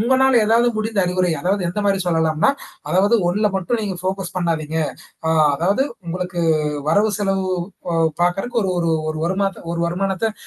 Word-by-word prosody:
உங்களால 260 +1 +4
ஏதாவது 235 +2 +4
முடிந்த 215 -1 0
அறிவுரை. 180 0 +1
அதாவது 195 +1 0
எந்த 210 +4 -2
மாரி 195 -1 +2
சொல்லலாம்னா, 160 - +2 0.4
அதாவது 200 +6 +3
ஒண்ணுல 210 +4 +2
மட்டும் 220 +5 -1
நீங்க 195 -3 -3
ஃபோக்கஸ் 190 -1 -3
பண்ணாதீங்க. 160 -2 -1 0.5
அ - - +1 0.3
அதாவது 195 - +1 0.2
உங்களுக்கு 180 0 -3 0.5
வரவு 210 +6 +3
செலவு 195 -2 0 0.5
அ - - 0 0.3
பார்கறக்கு 195 +7 0
ஒரு 190 - 0
ஒரு 170 -1 +1 0.2
ஒரு 155 - -5
வருமான 195 +1 -1
ஒரு 170 - -2
வருமானத்த 195 +4 -1
190 Hz, 155 wpm, -20 LUFS, 175-210 Hz, 0.5 s, உங்களால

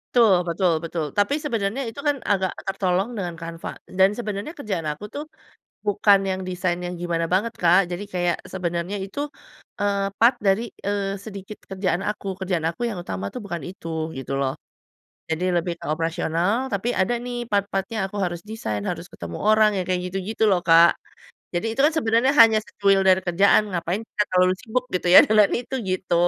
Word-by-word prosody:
Betul 190 -7 +5
betul 175 +1 +1
betul. 165 -2 -3
Tapi 205 +8 +3
sebenarnya 230 -1 -1
itu 280 - -11
kan, 290 - +3
agak 190 -2 0
tertolong 195 +3 0
dengan 175 -3 -3
Canva, 165 0 -7
dan 190 +2 +2
sebenarnya 215 - -5
kerjaan 195 - -3
aku 205 +9 -5
tuh, 295 +2 -5 0.6
bukan 205 -1 +4
yang 190 0 -2
desainnya 180 -1 -2
gimana 165 -1 -1
banget, 220 +5 +1
Kak. 180 +1 +4
Jadi 180 +3 -4
kayak, 175 -1 +1 0.2
sebenarnya 180 +2 -2
itu, 240 +10 -4 0.6
eee, 200 -1 0
part 245 +2 +6
dari, 210 +2 +1 0.2
eee, 200 -1 -1
sedikit 200 0 -9
kerjaan 190 0 -2
aku. 200 -2 -3
Kerjaan 185 -3 -1
aku 240 +8 -4
yang 200 -7 -3
utama 95 - -5
tuh 245 - -5
bukan 175 -4 -5
itu, 165 -3 -5
gitu 135 +1 -3
loh. 135 -1 0 0.7
Jadi 165 +2 -2
lebih 175 0 0
ke - - -13
operasional, 170 +9 -1
tapi 215 +5 -1
ada 190 +6 +1
nih, 245 0 -4
part-part-nya 200 +2 -1
aku 205 - -12
harus 175 -1 -2
desain, 110 - -3
harus - - -5
ketemu 85 -1 -7
orang, 215 -1 +4
ya 190 - 0
kayak 180 -1 +1
gitu-gitu 195 +4 -3
loh, 185 -3 +2
Kak. 165 +1 +6 0.6
Jadi 175 +6 -1
itu 230 - -3
kan 315 - +1
sebenarnya 245 -2 +2
hanya 220 -1 +8
secuil 195 -1 +2
dari 190 0 +5
kerjaan, 185 +4 +4
ngapain 180 +4 -2
kita 210 - -1
terlalu 185 0 +4
sibuk, 250 +1 -2
gitu 180 -1 -2
ya, - - +12
dengan 210 -2 +4
itu, 245 +2 -4
gitu. 185 -1 -1
195 Hz, 180 wpm, -23 LUFS, 175-215 Hz, 0.7 s, ya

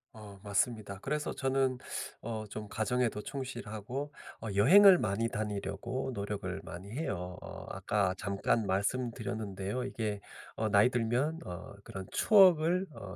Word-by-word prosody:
어 105 -3 -11
맞습니다. 100 -1 -1
그래서 150 +3 -2
저는 135 -1 +1 0.4
어 110 -1 -4
좀 105 +1 -6
가정에도 115 -1 0
충실하고 130 +1 -5 0.3
어 110 - -5
여행을 180 - +8
많이 110 +4 0
다니려고 115 +5 -3
노력을 100 -1 -4
많이 95 +4 -8
해요. 90 - -3
어 - - -8
아까 100 -3 0
잠깐 100 +3 0
말씀 100 +6 +1
드렸는데요. 105 +1 -4
이게 105 -5 -3 0.4
어 110 -1 0
'나이 100 +4 +6
들면 125 +7 0
어 90 +2 -7
그런 95 -1 -7
추억을 185 -3 +5
어 95 -8 -8
110 Hz, 285 characters per minute, -32 LUFS, 100-130 Hz, 0.4 s, 여행을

